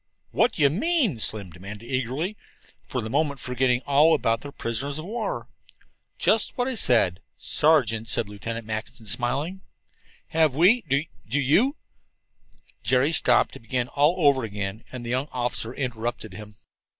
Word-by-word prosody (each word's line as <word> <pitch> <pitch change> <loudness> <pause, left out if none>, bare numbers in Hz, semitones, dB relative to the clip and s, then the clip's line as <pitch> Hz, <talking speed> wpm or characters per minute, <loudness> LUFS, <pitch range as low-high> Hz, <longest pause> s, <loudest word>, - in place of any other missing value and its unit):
"What 230 -1 +2
do 155 - 0
you 140 - +5
mean?" 240 - +1
Slim 105 -4 -1
demanded 100 +6 -10
eagerly, 130 - -2 0.5
for 125 - -2
the 110 - -5
moment 140 0 0
forgetting 125 0 0
all 150 +3 +5
about 115 -6 0
their 145 - -8
prisoners 140 +4 -3
of 155 - -6
war. 225 +3 -4 0.7
"Just 220 0 +2
what 245 0 0
I 265 - -1
said 115 - +2 0.2
sergeants," 115 -8 +2
said 115 - +1
Lieutenant 115 +2 -6
Mackinson, 110 +1 -6
smiling. 135 - 0 0.7
"Have 160 -4 +2
we 190 - +5
Do 140 +3 +2 0.3
you 190 - +3 0.5
" - - -30
Jerry 130 +4 +2
stopped 125 -6 +3
to - - -10
begin 120 +2 -2
all 150 +4 +3
over 135 -3 +4
again, 100 0 -5
and 125 -2 -7
the 120 - -4
young 130 +3 0
officer 120 -2 -2
interrupted 120 -5 -4
him. 105 +1 -10
130 Hz, 155 wpm, -25 LUFS, 115-155 Hz, 0.7 s, you